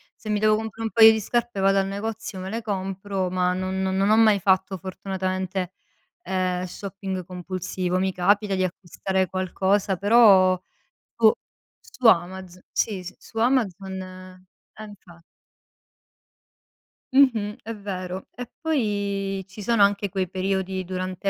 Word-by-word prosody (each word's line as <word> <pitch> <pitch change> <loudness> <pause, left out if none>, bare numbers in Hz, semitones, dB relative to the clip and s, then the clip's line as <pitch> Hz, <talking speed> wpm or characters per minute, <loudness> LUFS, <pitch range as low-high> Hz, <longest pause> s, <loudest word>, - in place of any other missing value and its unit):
se 215 - -10
mi 210 -1 +1
devo 215 0 +4
comprare 220 +1 -5
un 225 - -1
paio 225 -1 +8
di 220 - 0
scarpe 235 -1 -2
vado 195 0 +3
al 195 - +1
negozio, 205 0 -5
me 190 +1 -5
le 230 +2 -3
compro, 195 -2 -3
ma 180 0 +1
non 185 +1 -2
non 190 +1 +1
ho 215 - +6
mai 215 -3 +5
fatto 190 +1 +1
fortunatamente, 185 0 -4 0.5
ehm, 185 -1 -1
shopping 190 0 -6
compulsivo, 180 0 -3
mi 190 0 0
capita 200 +2 +2
di 185 - 0
acquistare 185 +1 -2
qualcosa, 190 +1 0
però 200 -3 +6 0.6
boh. 220 -2 +5 0.5
Su 250 - -3
Amaz 185 -1 +2
si, 195 -4 -1
si, 180 - -9
su 225 - -10
Amazon 200 -6 0
ehm, 185 0 -11 0.4
infa 180 -5 -15 1.9
Mh-mh, 230 -7 +3
è 225 0 -6
vero, 185 -2 -6
e 245 -1 -7
poi 200 -9 -1
ci 195 +2 -11
sono 215 0 +3
anche 200 0 +2
quei 190 -1 -2
periodi 190 0 -2
durante 185 +1 -3
190 Hz, 140 wpm, -24 LUFS, 185-210 Hz, 1.9 s, paio